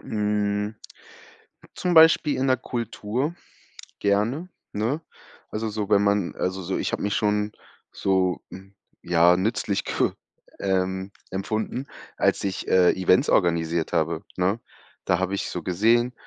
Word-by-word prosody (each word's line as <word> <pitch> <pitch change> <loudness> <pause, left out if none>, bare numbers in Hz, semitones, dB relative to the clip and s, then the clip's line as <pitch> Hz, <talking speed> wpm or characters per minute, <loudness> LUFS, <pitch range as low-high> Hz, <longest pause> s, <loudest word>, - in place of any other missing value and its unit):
Hm, 105 0 -1 1.0
zum 180 -1 -1
Beispiel 160 -2 +6
in 135 - +1
der 130 - +4
Kultur 120 +5 -3 0.7
gerne, 105 - +1 0.3
ne? 115 +9 -1 0.5
Also 110 +1 -3
so, 105 -1 -3
wenn 100 -1 +4
man 100 -3 +1
also 95 +1 -2
so, 95 +1 -2
ich - - -2
habe - - -2
mich 100 - 0
schon 105 -1 +1 0.4
so, 95 -2 +1
hm, 95 +1 -12 0.3
ja, 85 +1 +4
nützlich 100 0 -1
ge - - +1 0.5
ähm, 95 0 -1 0.2
empfunden, 110 +7 -3 0.3
als - - +2
ich, 95 -1 -3
äh, 90 -1 +5
Events 95 - +3
organisiert 85 -2 +1
habe, 80 -1 0
ne? 95 +5 +1 0.5
Da 90 - +2
habe 95 +1 -1
ich - - -3
so 90 - -5
gesehen, 115 +8 +2
100 Hz, 135 wpm, -25 LUFS, 95-110 Hz, 1.0 s, Beispiel